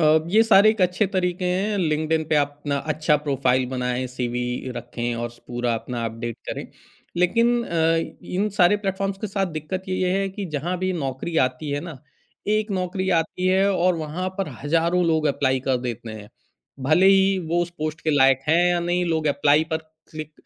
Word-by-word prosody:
अ, 155 0 +5
ये 220 +4 +6
सारे 215 -1 +6
एक 220 - -4
अच्छे 180 +3 +2
तरीके 180 -1 -1
हैं। 195 +4 0
लिंक्डइन 155 -1 0
पे 155 - +2
आप 145 -1 +3
अपना 145 -1 -1 0.2
अच्छा 155 0 +2
प्रोफ़ाइल 130 -3 +1
बनाएँ, 125 0 -2
सीवी 125 0 -3
रखें 120 0 -4
और 120 0 -4
स 120 - -19
पूरा 120 -1 -1
अपना 120 +1 -4
अपडेट 115 +1 -4
करें। - - -4 0.5
लेकिन 205 +7 +3
अ, 165 -2 +1 0.3
इन 200 +4 -1
सारे 180 +3 +5
प्लेटफ़ॉर्म्स 195 -1 -2
के 215 - -2
साथ 195 -1 -1
दिक्कत 185 +5 -4
ये 185 - -1
ही - - +1
है 195 0 0
कि 195 +1 -6
जहाँ 175 +6 -2
भी 185 +1 -1
नौकरी 145 0 -3
आती 135 +4 -6
है 145 - -1
ना, 160 -4 -8 0.5
एक 215 +1 +1
नौकरी 185 0 -2
आती 180 +3 -4
है 190 +2 +3
और 180 -1 +2
वहाँ 160 +4 -3
पर 195 -5 -1
हज़ारों 170 +4 +2
लोग 160 -1 +2
एप्लाई 130 -2 +1
कर 130 0 0
देते 120 -2 -5
हैं। 105 -1 -10 0.6
भले 155 +7 +4
ही 195 0 +5
वो 175 +1 +1
उस 175 - -5
पोस्ट 155 +1 -3
के 155 - 0
लायक 135 -2 +4
हैं 170 +2 +4
या 175 - +2
नहीं, 175 +1 0
लोग 160 -2 0
एप्लाई 145 +1 +3
पर 160 - +1 0.3
क्लिक 155 -1 -7
160 Hz, 195 wpm, -23 LUFS, 135-185 Hz, 0.6 s, ये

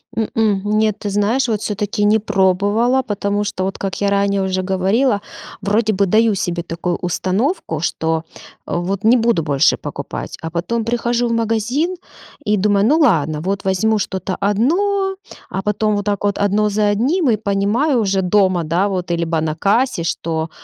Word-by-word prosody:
М-м, 220 -2 0 0.2
нет. 215 -2 +1
Ты 205 - -3
знаешь, 210 +6 +1
вот 215 -2 0
всё-таки 210 0 -2
не 215 +1 +4
пробовала. 205 +6 +2
Потому 205 -2 -1
что, 190 -2 -3
вот 195 - -3
как 195 -1 -3
я 200 - +2
ранее 200 0 +1
уже 190 0 -1
говорила, 200 +5 +1 0.4
вроде 215 +2 +1
бы 200 0 +2
даю 220 +3 +3
себе 175 -2 -2
такую 170 +1 -3
установку, 185 - -1
что 160 -1 -1 0.4
вот 185 +4 -2
не 230 +3 +5
буду 230 -7 +1
больше 140 -3 +2
покупать. - - -6
А 160 - -4
потом 200 +8 -2
прихожу 240 +1 0
в 230 - -1
магазин 230 - 0 0.5
и 210 0 +3
думаю: 200 0 +2
"Ну 305 +6 +3
ладно, 160 - +2
вот 195 +3 -3
возьму 210 +3 +1
что-то 190 -1 -3
одно." 385 - +1 0.3
А 190 - -3
потом 210 +1 0
вот 205 0 -2
так 205 -1 -1
вот 200 -1 0
одно 205 +1 +1
за 210 0 +1
одним, 270 - +1
и 225 - +4
понимаю 215 +7 +1
уже 195 -3 +1
дома, 185 -2 +2
да, 170 +5 +1
вот 180 -3 -3
либо 170 -1 0
на 155 -1 -2
кассе, 200 +2 +1
что: 160 -1 -2
205 Hz, 170 wpm, -18 LUFS, 185-225 Hz, 0.5 s, не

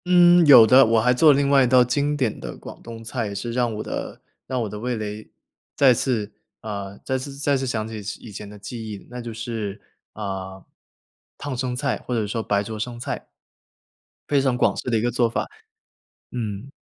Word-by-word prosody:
嗯， 175 -1 +6
有 125 -6 +10
的， 130 +4 +7
我 115 -1 +3
还 125 +3 +3
做 150 +4 +6
了 140 - +3
另 140 0 +2
外 140 -1 +5
一 - - +3
道 125 0 +6
经 145 +4 0
典 130 -6 -1
的 - - -7
广 - - -11
东 115 -1 -9
菜， 115 0 -3
也 100 - -6
是 115 +4 -4
让 120 0 0
我 105 - -4
的 - - -5 0.3
让 130 -1 -2
我 - - -3
的 105 +1 -7
味 125 +2 -2
蕾 105 0 -6 0.5
再 135 -3 +6
次 115 -4 -1 0.3
呃， 100 -2 -6
再 130 -1 -1
次 135 +1 -7
再 140 0 +1
次 135 0 -2
想 110 -3 -2
起 110 -1 -6 0.2
以 115 - -11
前 100 +1 -8
的 105 - -11
记 110 +2 -7
忆， 100 -2 -9
那 125 0 -6
就 120 -1 -6
是， 110 -3 -5 0.3
呃， 95 -2 -6 0.7
烫 145 -2 -5
生 125 0 -2
菜， 140 +1 -1
或 125 - -3
者 110 -2 0
说 110 +2 -2
白 100 -1 0
灼 110 +1 -6
生 120 +2 -4
菜。 120 - -5 1.0
非 145 -2 +3
常 130 -2 +1
广 - - +2
式 - - -4
的 115 - +2
一 - - 0
个 120 +1 0
做 120 0 +2
法。 115 - -2 0.9
嗯。 115 +1 -5
120 Hz, 230 characters per minute, -23 LUFS, 110-130 Hz, 1.0 s, 有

